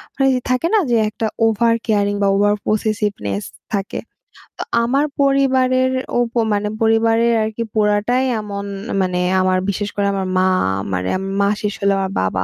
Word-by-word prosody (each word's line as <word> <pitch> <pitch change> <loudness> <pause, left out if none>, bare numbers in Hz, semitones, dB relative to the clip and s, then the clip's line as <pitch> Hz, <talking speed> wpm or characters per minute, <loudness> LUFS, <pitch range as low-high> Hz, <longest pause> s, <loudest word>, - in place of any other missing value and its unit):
মানে 270 0 +2 0.2
থাকে 255 +6 +1
না 435 - +5
যে - - +4
একটা 220 +1 -4 0.2
ওভার 230 +1 +2
কেয়ারিং 205 -2 +1
বা - - +3
ওভারপসেসিভনেস 205 - 0 0.3
থাকে। 195 -1 -3 0.6
তো - - -2 0.2
আমার 275 +5 +1 0.2
পরিবারের 260 -2 +2 0.3
ও - - +3
ব - - -43 0.2
মানে 205 0 0
পরিবারের 225 +1 +3
আরকি 220 +1 -3
পোড়াটাই 215 +4 +1 0.2
এমন 200 -1 -6 0.4
মানে 180 -1 -1 0.2
আমার 185 0 +2
বিশেষ 205 +1 -2
করে 200 0 0
আমার 190 -1 -2
মা 185 - +3 0.5
মারে 90 0 -1 0.3
মা 200 - +3
শেষ 210 -1 -1
হলে 200 0 +3
আমার 190 0 -2
বাবা। 95 0 -1
210 Hz, 155 wpm, -19 LUFS, 200-235 Hz, 0.6 s, না